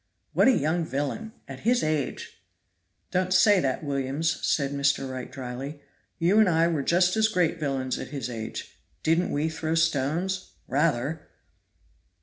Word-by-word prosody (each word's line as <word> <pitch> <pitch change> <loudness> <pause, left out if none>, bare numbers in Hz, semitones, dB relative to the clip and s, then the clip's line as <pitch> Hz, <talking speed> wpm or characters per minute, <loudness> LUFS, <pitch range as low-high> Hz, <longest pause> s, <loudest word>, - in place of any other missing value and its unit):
"What - - +4
a - - +8
young 160 +4 0
villain! 145 - -3 0.2
at 135 -1 -8
his 240 - +2
age 155 -3 -2 0.3
" 90 +1 -48
"Don't 185 0 0
say 190 +2 +6
that, 135 -1 -1
Williams," 140 +3 -1
said 140 -2 +1
Mr. 140 -1 +1
Wright 130 -1 -6
dryly, 135 +3 -6 0.4
"you 180 +5 +3
and 215 -4 +5
I 165 0 +3
were 160 -4 0
just 180 +6 +3
as 220 0 +4
great 180 -5 +1
villains 135 -4 -2
at - - -5
his 135 -5 -4
age. 115 -3 -7 0.2
Didn't 165 +3 +2
we 150 +2 0
throw 160 0 -2
stones? 165 +4 0
rather!" 150 0 0
155 Hz, 155 wpm, -26 LUFS, 135-175 Hz, 0.4 s, a